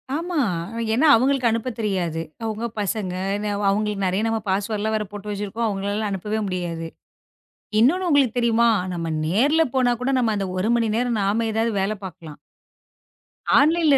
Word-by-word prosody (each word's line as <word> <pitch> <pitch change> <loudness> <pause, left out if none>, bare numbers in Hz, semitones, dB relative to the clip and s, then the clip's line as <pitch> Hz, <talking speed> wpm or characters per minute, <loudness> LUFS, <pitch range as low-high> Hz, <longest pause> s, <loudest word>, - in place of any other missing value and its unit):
ஆமா. 340 +1 -2 0.5
ஏன்னா 270 +7 +3
அவங்களுக்கு 255 +1 +2
அனுப்ப 230 +3 -1
தெரியாது. 180 -6 -1 0.2
அவங்க 220 +1 -3
பசங்க, 200 -2 -2 0.2
என் 210 +1 -3
அவ் 205 - -3
அவங்களுக்கு 205 -1 0
நறைய 190 +4 0
நம்ம 225 0 0
பாஸ்வேர்ட் 205 +2 -1
எல்லாம் 220 0 0
வேற 210 - -3
போட்டு 205 0 -7
வச்சிருக்கோம். 205 +3 -2
அவங்களால 205 +1 -2
அனுப்பவே 210 +3 -2
முடியாது. 170 -3 -3 0.9
இன்னொன்னு 355 +10 +3
உங்களுக்குத் 270 -6 +3
தெரியுமா? 235 0 +3 0.3
நம்ம 165 -1 -3 0.2
நேர்ல 280 - +3
போனா 250 -2 +3
கூட 255 +2 0
நம்ம 230 -3 +2
அந்த 195 -1 -1
1 215 +5 0
மணி 230 -1 +1
நேரம் 240 -2 0
நாம 215 +4 +1
ஏதாவது 225 +1 +1
வேல 195 +2 0
பாக்கலாம். 165 -5 -9 1.2
ஆன்லைன்ல 310 -1 +4
220 Hz, 160 wpm, -23 LUFS, 195-245 Hz, 1.2 s, ஆன்லைன்ல